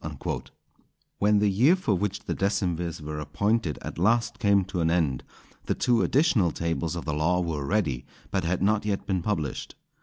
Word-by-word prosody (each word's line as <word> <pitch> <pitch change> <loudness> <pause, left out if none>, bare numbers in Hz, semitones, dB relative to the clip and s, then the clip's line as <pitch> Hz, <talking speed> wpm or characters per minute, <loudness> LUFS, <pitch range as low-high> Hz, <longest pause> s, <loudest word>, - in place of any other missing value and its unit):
_" - - -4 0.7
When 105 +1 +4
the 105 0 +3
year 120 - +4
for 180 - 0
which 100 +1 -1
the - - -3
decemvirs 90 -4 -1
were 75 0 -5
appointed 85 +4 0
at - - -6
last 115 +4 +2
came 100 -4 +3
to 90 -2 -3
an 80 - +2
end, 80 -7 +1 0.4
the - - +1
two 120 -2 +2
additional 130 - +3
tables 85 0 -2
of 85 - -5
the 75 - -1
law 80 +4 +1
were 80 -5 -2
ready, 80 -12 0 0.2
but 95 -2 0
had 90 +2 0
not 105 +1 +2
yet 105 -2 -2
been 95 -3 0
published. 80 -8 -3
95 Hz, 185 wpm, -26 LUFS, 80-105 Hz, 0.7 s, When